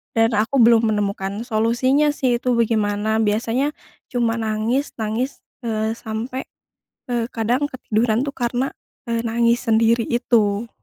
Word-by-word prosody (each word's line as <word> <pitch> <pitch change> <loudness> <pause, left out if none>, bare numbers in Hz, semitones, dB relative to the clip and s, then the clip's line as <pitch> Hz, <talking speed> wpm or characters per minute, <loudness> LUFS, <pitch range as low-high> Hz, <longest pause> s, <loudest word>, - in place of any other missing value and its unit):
Dan 225 +1 +3
aku 225 +6 0
belum 225 -1 +5
menemukan 200 +1 -2
solusinya 255 +6 +2
sih 245 -3 +1
itu 250 -1 0
bagaimana, 220 -1 +1
biasanya 230 +7 0 0.3
cuma 235 -2 0
nangis 220 +5 -1
nangis, 225 +4 -3 0.2
eee, 220 -1 -1
sampai, 235 +4 -5 0.6
eee, 240 -1 0
kadang 240 +5 0
ketiduran 230 -1 0
tuh 280 0 -4
karena, 245 +2 -1 0.4
eee, 230 0 0
nangis 235 +2 +1
sendiri 230 +1 +3
itu. 230 -2 +1
230 Hz, 125 wpm, -21 LUFS, 220-245 Hz, 0.6 s, belum